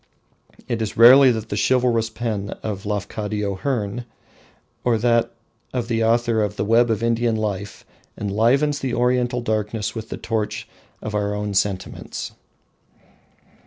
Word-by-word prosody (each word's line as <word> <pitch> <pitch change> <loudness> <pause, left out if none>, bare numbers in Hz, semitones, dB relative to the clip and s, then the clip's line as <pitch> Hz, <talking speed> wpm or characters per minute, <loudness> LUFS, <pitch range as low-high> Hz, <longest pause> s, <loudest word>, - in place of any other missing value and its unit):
It 115 -1 -2
is 110 - -3
rarely 130 +4 +9
that 110 -2 -2
the - - -2
chivalrous 120 -3 +2
pen 110 -3 -3
of 100 -2 -4
a - - -2
Lafcadio 105 0 -2
Hearn 120 -3 -2 0.8
or 120 -2 +2
that 115 +1 +2 0.5
of 120 -1 -2
the 115 -1 +1
author 115 0 +2
of 105 - -1
"The - - -2
Web 115 +2 +4
of 110 0 0
Indian 115 0 +1
Life" 100 -2 -4 0.3
enlivens 120 +9 +2
the 130 -3 -2
Oriental 125 0 +1
darkness 105 -2 -2
with 110 -1 -7
the - - -5
torch 110 -2 -3 0.4
of 110 - -4
our 105 0 -1
own 105 0 -3
sentiments. 95 -1 -2
110 Hz, 145 wpm, -22 LUFS, 105-120 Hz, 0.8 s, rarely